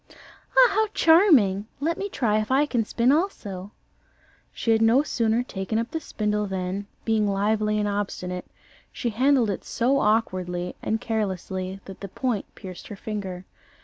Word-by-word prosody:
"Ah, - - +8
how 435 0 +2
charming! 280 - +5
Let 325 +4 0
me 400 +1 -4
try 215 - +1
if 215 - -5
I 270 +3 +4
can 245 -6 0
spin 235 +4 +2
also." 205 - -2 0.8
She 230 - -1
had 220 0 +3
no 230 +5 +5
sooner 230 -4 +1
taken 195 -2 -3
up 230 +1 -2
the 320 - -2
spindle 210 -7 -2
than, 190 +1 -3 0.2
being 220 -2 +2
lively 210 +2 +1
and 210 0 0
obstinate, 185 -3 -3 0.4
she 240 - -3
handled 250 -1 +3
it 195 - -5
so 260 +4 +1
awkwardly 185 -6 0
and 220 - -1
carelessly 190 -3 -3
that 195 -1 -10
the 195 - -6
point 235 0 -2
pierced 185 -2 -9
her 205 - -7
finger. 195 -3 -5
215 Hz, 160 wpm, -25 LUFS, 195-245 Hz, 0.8 s, Ah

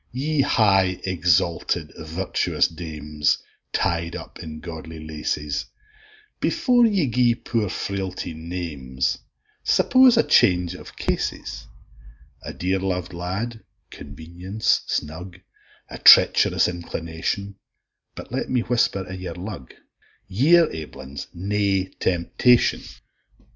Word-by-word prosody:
Ye 145 +4 0
high, 95 -7 +3
exalted, 85 -2 0
virtuous 80 +5 -1
dames, 75 -3 -2 0.3
Tied 85 0 -1
up - - -9
in 80 -1 -8
godly 80 -1 -8
laces, 75 -2 -3 0.7
Before 245 -2 +3
ye 200 -8 +1
gie 120 -1 +2
poor 115 -3 -2
Frailty 95 -3 -4
names, 80 -6 -3 0.4
Suppose 255 -2 +5
a - - +5
change 90 -1 +3
o' - - -11
cases; - - -4 0.7
A - - -7
dear 95 +2 -1
lov'd 90 -1 -3
lad, 100 +7 -4 0.3
convenience 90 +6 -2
snug, 85 +4 -4 0.5
A - - -9
treach'rous - - +7
inclination 85 +3 -4 0.6
But - - -10
let - - -3
me 125 -2 +1
whisper 115 -5 0
i' 95 - -7
your 90 -3 -6
lug, 90 - -8 0.6
Ye're 150 - +5
aiblins 70 -3 -8
nae 95 0 0
temptation. 95 +7 +2
90 Hz, 105 wpm, -23 LUFS, 80-105 Hz, 0.7 s, treach'rous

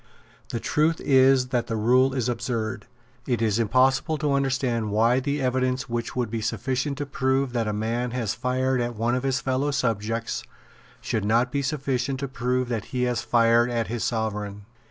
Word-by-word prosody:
The 115 - -3
truth 155 +6 +1
is 130 -1 +4
that 125 -2 0
the 115 - -2
rule 125 +4 +3
is 125 -3 0
absurd. 115 -2 -3 0.4
It 125 -3 0
is 110 -1 +1
impossible 130 +7 +2
to 150 -2 0
understand 130 -5 0
why 115 +4 +3
the 140 +2 -2
evidence 130 0 0
which 115 0 -3
would 125 -4 -1
be 115 -1 -2
sufficient 130 +5 -2
to 145 - -3
prove 130 -1 0
that 115 -3 0
a - - 0
man 115 +4 -1
has 120 -4 -2
fired 130 +1 0
at 120 0 -2
one 115 +3 0
of 125 - 0
his 135 0 0
fellow 135 +2 0
subjects 115 -4 -1 0.6
should 110 - -2
not 115 +4 +2
be 140 - 0
sufficient 135 -2 -1
to 140 - -2
prove 125 0 -1
that 115 -4 -3
he 125 -1 -2
has 125 -1 0
fired 115 0 +3
at 115 -4 -1
his 115 -1 -2
Sovereign. 105 -3 -3
125 Hz, 185 wpm, -25 LUFS, 115-130 Hz, 0.6 s, is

